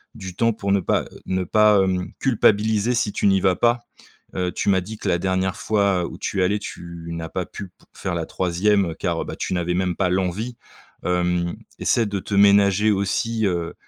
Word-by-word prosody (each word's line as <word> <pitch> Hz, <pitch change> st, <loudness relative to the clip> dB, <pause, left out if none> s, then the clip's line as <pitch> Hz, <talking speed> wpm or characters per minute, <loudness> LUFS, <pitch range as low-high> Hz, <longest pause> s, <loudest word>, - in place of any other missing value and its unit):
du 95 Hz, -2 st, -8 dB
temps 115 Hz, +1 st, +2 dB
pour 100 Hz, -2 st, -3 dB
ne 100 Hz, -, +4 dB
pas, -, -, +1 dB
heu, -, -, -13 dB, 0.2 s
ne 95 Hz, 0 st, -1 dB
pas, 105 Hz, +1 st, +4 dB
hem, 90 Hz, -1 st, -1 dB
culpabiliser 110 Hz, -2 st, +2 dB
si 110 Hz, -3 st, 0 dB
tu -, -, -2 dB
n'y 95 Hz, -1 st, +3 dB
vas 95 Hz, -1 st, +3 dB
pas. 120 Hz, +4 st, +2 dB, 0.6 s
Heu, 90 Hz, -1 st, -1 dB
tu -, -, -1 dB
m'as 95 Hz, -2 st, +3 dB
dit 110 Hz, +4 st, -8 dB
que -, -, -6 dB
la 85 Hz, -, +2 dB
dernière 95 Hz, 0 st, 0 dB
fois 100 Hz, -4 st, +1 dB
où -, -, -7 dB
tu 95 Hz, -, -2 dB
es -, -, +4 dB
allé, 100 Hz, +3 st, +1 dB
tu 85 Hz, -4 st, -8 dB
n'as 80 Hz, -1 st, -5 dB
pas 90 Hz, +2 st, -3 dB
pu 100 Hz, -, -8 dB
p -, -, -40 dB, 0.2 s
faire 95 Hz, -, -4 dB
la 85 Hz, -1 st, -2 dB
3e 95 Hz, 0 st, +1 dB
car, -, -, -1 dB
heu, -, -, -4 dB
bah, -, -, -6 dB
tu -, -, -3 dB
n'avais 90 Hz, -1 st, -1 dB
même 90 Hz, -1 st, 0 dB
pas 95 Hz, 0 st, +1 dB
l'envie. 95 Hz, +6 st, -2 dB, 0.5 s
Hem, 90 Hz, -1 st, 0 dB, 0.2 s
essaie 115 Hz, -, +2 dB
de 100 Hz, -1 st, -3 dB
te 100 Hz, +2 st, -4 dB
ménager 100 Hz, +1 st, +5 dB
aussi, 110 Hz, +3 st, 0 dB
heu, 85 Hz, -2 st, -2 dB
95 Hz, 215 wpm, -22 LUFS, 90-105 Hz, 0.6 s, ménager